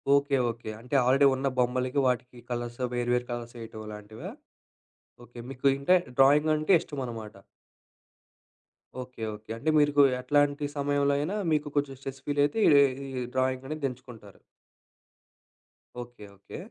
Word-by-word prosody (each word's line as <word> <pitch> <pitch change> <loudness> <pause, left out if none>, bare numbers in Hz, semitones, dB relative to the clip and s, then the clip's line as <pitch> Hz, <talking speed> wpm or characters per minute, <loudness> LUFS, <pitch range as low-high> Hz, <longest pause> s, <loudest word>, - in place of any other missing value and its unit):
Okay, 140 0 +2
okay. 115 -1 -6
అంటే 125 +4 -4
already 135 +2 +4
ఉన్న 135 +1 -1
బొమ్మలకి 125 +2 +1
వాటికి 125 0 -2
కలర్స్ 120 0 -4
వేరు 120 0 -1
వేరు 125 0 0
కలర్స్ 120 0 -6
వేయటం 110 -1 -8
లాంటివా? 105 +1 -9 0.9
ఓకే. 120 0 -13
మీకు 135 +1 -1
ఇంకా 180 +7 +4 0.2
డ్రాయింగ్ 145 +3 +5
అంటే 155 +5 +2
ఇష్టమన్నమాట. 115 -7 -6 1.7
ఓకే. 125 -2 -11
ఓకే. 110 +1 -17
అంటే 155 +7 -2
మీరుకు 145 -1 +4 0.2
ఏట్లాంటి 145 +2 +1
సమయంలో 140 0 +1
అయినా 175 +8 -2 0.2
మీకు 150 -1 +1
కొంచెం 140 -1 0
స్ట్రెస్ 135 -1 -8
ఫీల్ 145 0 +1
అయితే 150 +10 -2
ఈ - - +7 0.5
ఈ - - -3
డ్రాయింగ్ 130 0 0
అనేది 155 -2 -2
ఏంచుకుంటారు. 120 -6 -13 1.6
ఓకే. 120 -3 -11
ఓకే. 100 - -10
130 Hz, 135 wpm, -28 LUFS, 120-145 Hz, 1.7 s, ఈ